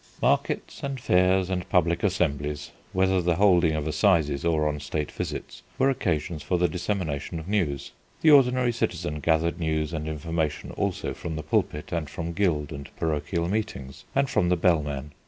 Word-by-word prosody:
Markets - - 0
and 140 -1 -3
fairs 90 -4 +3
and 90 -2 -2
public 85 -3 +2
assemblies, 75 -6 -1 0.2
whether 95 -1 +2
the 85 -1 +1
holding 90 -4 +4
of 75 -1 -2
assizes 80 -5 +2
or 80 -2 +2
on 75 -1 -2
State 75 +1 -3
visits, - - -5 0.2
were 135 +1 +4
occasions 85 - -1
for 90 - 0
the 90 0 +3
dissemination 85 -3 -3
of 80 - -9
news. 85 -10 -1 0.3
The 160 - +6
ordinary 130 -3 +5
citizen 75 -9 -2
gathered 85 +2 +1
news 80 0 -1
and 80 -1 -3
information 80 0 -2
also - - -2
from 80 -2 -5
the 75 - -4
pulpit 75 +1 -1
and 80 -4 -2
from 85 +3 -4
guild 80 -6 0
and 70 -1 -7
parochial 85 +2 -1
meetings, 95 -10 -4
and 140 0 +3
from 105 -10 +1
the 90 - +3
bellman. 75 -5 +1
85 Hz, 170 wpm, -26 LUFS, 75-95 Hz, 0.3 s, The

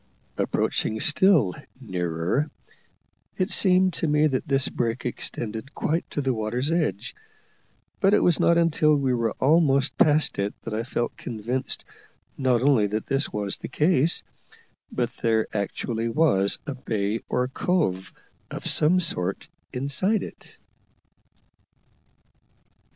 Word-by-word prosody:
Approaching 110 - -1
still 155 - +3 0.3
nearer, 90 - -2 0.9
it 185 +3 -1
seemed 185 -1 +4
to 165 - -1
me 150 0 +3
that 140 +1 -1
this 135 -1 +2
break 115 +1 -2
extended 115 0 -4
quite 165 +3 -1
to 145 - -2
the 135 -2 0
water's 120 +6 -2
edge; 150 - -1 0.9
but 195 -1 +4
it 210 - +4
was 175 - +3
not 170 - +4
until 155 -2 +3
we 135 -3 +1
were 115 -2 0
almost 140 -2 +2
past 150 -7 +3
it 100 +1 -1
that 115 - -5
I 110 - -1
felt 120 0 -3
convinced 120 +3 -4 0.5
not 130 -3 +1
only 130 -7 +4
that 105 +2 -3
this 135 +1 0
was 100 -2 -2
the - - -7
case, 155 0 +2 0.7
but 120 -1 -1
that - - -24
there 110 -2 +2
actually 115 +3 -2
was 115 -8 +2
a 145 - -4
bay 110 -4 -2
or 125 0 0
cove 130 - -1 0.4
of - - -7
some 165 +5 +3
sort 100 - -1 0.2
inside 140 - 0
it. - - -12
130 Hz, 135 wpm, -25 LUFS, 110-155 Hz, 0.9 s, seemed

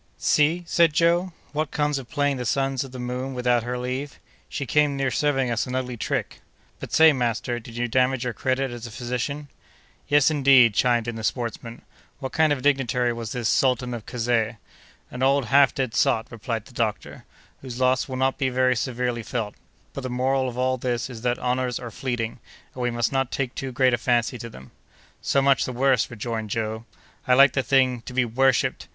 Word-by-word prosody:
"See," 160 +4 +2
said 170 -2 +3
Joe, 170 +3 +2 0.2
"what 150 +1 -2
comes 150 -1 0
of 125 - -11
playing 145 -3 0
the 125 - -3
sons 135 0 0
of 135 - -10
the 130 - -8
moon 125 +2 -4
without 125 -1 +2
her 125 +2 -4
leave! 130 +3 -4 0.3
She 140 - -4
came 145 +2 +2
near 135 -1 0
serving 135 -4 +1
us 115 +2 -1
an 125 - -4
ugly 125 -1 -2
trick. 115 - -3 0.4
But - - -8
say, 160 -1 +6
master, 120 -1 -1
did 115 0 -11
you 120 0 0
damage 130 +1 +1
your 125 -1 -2
credit 130 +1 -1
as 120 0 -7
a - - -9
physician?" 125 +5 -4 0.6
"Yes, 145 +1 +4
indeed," 135 -6 +5
chimed 120 +1 +2
in 120 -1 -4
the 110 - -6
sportsman. 115 0 -4 0.3
"What 135 -2 -5
kind 160 -1 +3
of 145 - +2
a - - -9
dignitary 125 -4 +1
was 115 -1 -6
this 120 -3 -2
Sultan 125 -1 +1
of 115 -3 -7
Kazeh?" 115 -2 0 0.5
"An 125 - -7
old 135 0 +3
half 140 -1 +6
dead 130 -4 -3
sot," 115 -1 +2
replied 115 -1 -4
the 130 - -16
doctor, 110 -3 -3 0.4
"whose 125 -2 -7
loss 130 0 +2
will 130 - -4
not 135 +1 0
be 135 -2 +1
very 130 0 +2
severely 125 0 -2
felt. 110 -2 -4 0.4
But 140 - -5
the 130 - -4
moral 130 +1 0
of 120 - -9
all 130 0 +1
this 125 0 -2
is 115 -3 -9
that 120 0 0
honors 125 0 -1
are 120 -2 -7
fleeting, 120 -1 -3 0.3
and 130 - -7
we 125 - +1
must 120 -1 -1
not 135 -2 0
take 130 -2 -3
too 135 -1 -5
great 130 0 +3
a 120 - +1
fancy 120 0 0
to 115 - -7
them." 65 - -13 0.5
"So 140 - +1
much 135 -1 +4
the - - -3
worse!" 130 -1 +2
rejoined 110 -1 -4
Joe. 110 +1 -3 0.4
"I 125 - +5
liked 140 +1 +6
the 135 - +1
thing—to 130 -2 +1
be 130 -1 +3
worshipped! 130 +2 +1
125 Hz, 205 wpm, -24 LUFS, 120-135 Hz, 0.6 s, say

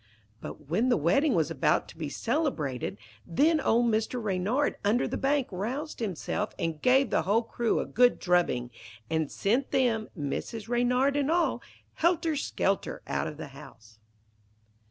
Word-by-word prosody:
But 150 - -9
when 215 - +1
the 245 - +4
wedding 260 - +2
was 160 -1 +1
about 140 -5 +1
to - - -12
be 160 -3 -4
celebrated, 225 - -2 0.3
then 305 - +2
old 240 -1 +3
Mr. 220 +3 0
Reynard 215 +6 0
under 215 +5 +2
the - - -3
bank 275 -1 +1
roused 250 - -4
himself, 210 0 -3
and 160 -2 -3
gave 260 +1 +4
the - - +3
whole 205 +7 +2
crew 230 0 0
a - - -2
good 245 +1 +3
drubbing, 175 -9 +1 0.4
and 160 -2 0
sent 240 +7 0
them, 230 -4 +1
Mrs. 195 +9 -4
Reynard 250 +3 +2
and 290 0 +1
all, 340 +1 +1 0.4
helter 330 -1 +2
skelter 200 -8 -1
out - - -2
of 150 - -7
the 155 - -7
house. 115 -6 -15
220 Hz, 155 wpm, -28 LUFS, 165-265 Hz, 0.4 s, the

